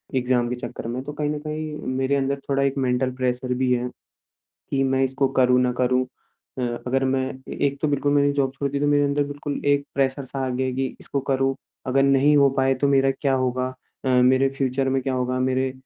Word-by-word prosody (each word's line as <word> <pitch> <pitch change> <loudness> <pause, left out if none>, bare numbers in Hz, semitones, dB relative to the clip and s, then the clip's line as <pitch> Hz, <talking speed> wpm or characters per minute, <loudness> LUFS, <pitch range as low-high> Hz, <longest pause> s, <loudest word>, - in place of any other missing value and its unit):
Exam 125 -1 +1
के 125 - -2
चक्कर 120 -1 -7
में। 125 +2 -3
तो 145 - -6
कहीं 150 0 -2
न 150 0 -2
कहीं 155 0 -4 0.2
मेरे 135 +1 +1
अंदर 140 0 0
थोड़ा 140 0 +2
एक 140 0 0
मैंटल 130 -1 +1
प्रेशर 125 0 -1
भी 130 0 0
है, 125 0 -1 0.8
कि 135 -1 +1
मैं 135 0 +1
इसको 135 +1 0
करूँ 125 0 +5
ना 125 -1 +2
करूँ। 125 0 +2 0.5
अ, - - -1 0.2
अगर 135 +1 +1
मैं 130 0 +1 0.3
ए - - -6
एक 140 0 -2
तो 155 - +1
बिल्कुल 145 0 +1
मैंने 145 0 +3
जॉब 135 -2 0
छोड़ 140 0 -2
दी 140 0 -2
तो 145 - +1
मेरे 145 0 +3
अंदर 145 0 +1
बिल्कुल 145 0 -5
एक 145 0 +3
प्रेशर 135 0 0
सा 135 +1 -4
आ - - -1
गया 130 +1 -1
है 130 - -2
कि 135 +1 -1
इसको 140 - -3
करूँ। 135 0 0 0.3
अगर 135 +1 +2
नहीं 140 +2 +4
हो 140 -1 +6
पाए 135 0 +3
तो 140 +2 0
मेरा 135 -1 +4
क्या 140 -2 +1
होगा? 130 0 0 0.4
अ, - - 0
मेरे 130 +2 +4
फ्यूचर 135 0 -1
में 135 0 +1
क्या 135 0 -1
होगा 125 0 -1
मेरे 130 0 0
135 Hz, 230 wpm, -23 LUFS, 130-140 Hz, 0.8 s, हो